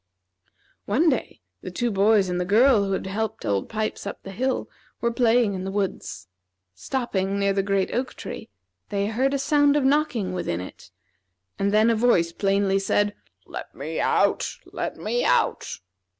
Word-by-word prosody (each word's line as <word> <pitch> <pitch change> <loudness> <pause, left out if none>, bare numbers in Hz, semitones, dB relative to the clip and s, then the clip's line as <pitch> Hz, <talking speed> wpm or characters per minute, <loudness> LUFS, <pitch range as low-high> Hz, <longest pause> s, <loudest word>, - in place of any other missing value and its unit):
One 295 +11 +3
day 265 - -2 0.2
the - - -6
two 240 -1 -1
boys 200 0 +4
and 180 0 -1
the - - +1
girl 215 +3 +4
who 195 - -1
had 190 - -2
helped 220 +3 -3
Old 100 -1 -1
Pipes 215 -2 -3
up - - -7
the 195 - -8
hill 260 +6 -1 0.3
were 235 - 0
playing 235 -2 +3
in 185 -1 -4
the 190 - -3
woods. 195 -1 -3 0.5
Stopping 200 - -2
near 200 0 +2
the 195 - +1
great 195 -1 0
oak 250 +1 -2
tree, - - -8 0.4
they 200 0 0
heard 245 +6 +1
a - - +2
sound 290 +1 +3
of 295 - +2
knocking 265 -9 +1
within 130 - -2
it, 90 - -10 0.7
and 200 0 +1
then 215 +2 +4
a - - +2
voice 215 -8 +3
plainly 195 +1 +1
said: 205 +1 +1 0.3
"Let - - -8
me - - -4
out! - - +2 0.2
let - - -5
me 485 +1 -1
out!" - - +2
205 Hz, 175 wpm, -24 LUFS, 195-245 Hz, 0.7 s, boys